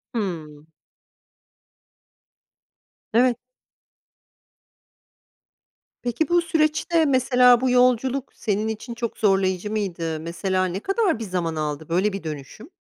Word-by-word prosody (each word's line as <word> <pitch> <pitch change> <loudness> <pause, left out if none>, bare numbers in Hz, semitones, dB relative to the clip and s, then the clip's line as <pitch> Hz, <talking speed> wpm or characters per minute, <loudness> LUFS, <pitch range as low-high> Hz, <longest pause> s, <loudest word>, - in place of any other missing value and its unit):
Hımm. 155 -8 -4 2.5
Evet. 245 +1 +4 2.6
Peki 245 +7 -1
bu 345 0 +4
süreçte, 325 0 +1
mesela 250 -2 +4
bu 260 - +1
yolculuk 250 +1 +2
senin 210 0 -1
için 220 +2 -5
çok 235 -1 -5
zorlayıcı 195 -1 +1
mıydı? 170 -7 -3
Mesela 185 +3 -1
ne 185 +1 -3
kadar 390 - 0
bir - - -4
zaman 180 -5 -2
aldı 150 0 -4
böyle 190 +5 +1
bir 195 - -5
dönüşüm? 155 - -8
215 Hz, 105 wpm, -23 LUFS, 180-250 Hz, 2.6 s, Evet